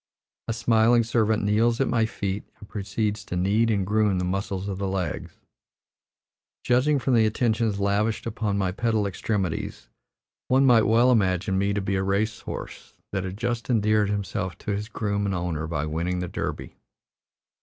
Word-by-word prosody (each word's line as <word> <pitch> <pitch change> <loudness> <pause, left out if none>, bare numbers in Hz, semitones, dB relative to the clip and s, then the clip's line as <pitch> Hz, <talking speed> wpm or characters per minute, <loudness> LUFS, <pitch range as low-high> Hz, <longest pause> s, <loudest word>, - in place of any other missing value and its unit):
A 115 - 0
smiling 115 +1 +3
servant 110 -2 +1
kneels 115 +3 +2
at 135 - +2
my 115 -2 +2
feet 100 -2 -3 0.2
and 105 - -12
proceeds 105 +1 -2
to - - -5
knead 100 +6 +2
and 100 -4 +1
"groom" 105 -1 +2
the 90 - -1
muscles 95 +1 -2
of 95 -1 -4
the 100 - -1
legs. 95 -4 -3 1.3
Judging 130 +4 +3
from 135 0 0
the 110 -2 +5
attentions 110 -2 0
lavished 105 +2 0
upon 105 -3 -2
my 95 -2 0
pedal 110 +1 0
extremities, 100 -2 -3 0.6
one 130 +2 +4
might 120 -4 +5
well 120 +3 +5
imagine 95 -3 +1
me 100 +1 +1
to 100 0 -1
be 95 0 -1
a - - 0
race 100 +3 0
horse - - -8 0.2
that 95 -2 -2
had 95 +1 -5
just 120 +1 -2
endeared 110 -3 +2
himself 100 -2 -3
to - - -4
his 105 +2 -3
groom 100 -2 -1
and 95 - -1
owner 85 -3 -2
by 75 -2 -2
winning 85 +4 -2
the 90 0 -3
Derby. - - -5
105 Hz, 175 wpm, -25 LUFS, 95-115 Hz, 1.3 s, the